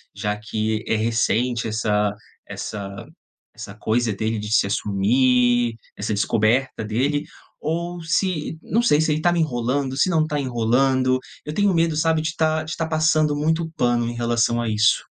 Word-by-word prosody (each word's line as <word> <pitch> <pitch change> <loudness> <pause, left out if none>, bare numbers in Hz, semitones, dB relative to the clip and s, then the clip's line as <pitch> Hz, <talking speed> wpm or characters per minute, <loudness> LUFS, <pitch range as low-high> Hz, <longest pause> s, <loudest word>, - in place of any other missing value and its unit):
já 105 0 -2
que 110 0 -2
é - - +1
recente 115 +1 0
essa 105 -1 0 0.4
essa 100 -2 -6 0.5
essa - - -9
coisa 115 +1 0
dele 110 +2 -2
de 105 0 -6
se 110 - +4
assumir, 120 +4 +2 0.2
essa 100 +2 -3
descoberta 110 +5 +1
dele. 135 +7 0 0.4
Ou 170 +3 -3
se, 165 -1 -1
não 230 - +1
sei, 220 -11 +3
se 160 0 +2
ele 155 - -2
tá 175 - +3
me 175 - 0
enrolando, 130 -1 -1
se 165 - +3
não 160 -3 +2
tá 150 -1 -2
enrolando. 130 +1 +1 0.3
Eu 150 - -5
tenho 205 +3 +2
medo, 165 -1 +2
sabe, 160 +1 +2
de 160 0 -3
tá 155 0 +1
de 155 0 -5
tá 165 - -2
passando 155 -1 +2
muito 160 +2 0
pano 120 -1 +1
em - - -5
relação 120 0 +1
a 120 - -2
isso. 110 +1 +3
125 Hz, 170 wpm, -22 LUFS, 110-155 Hz, 0.5 s, se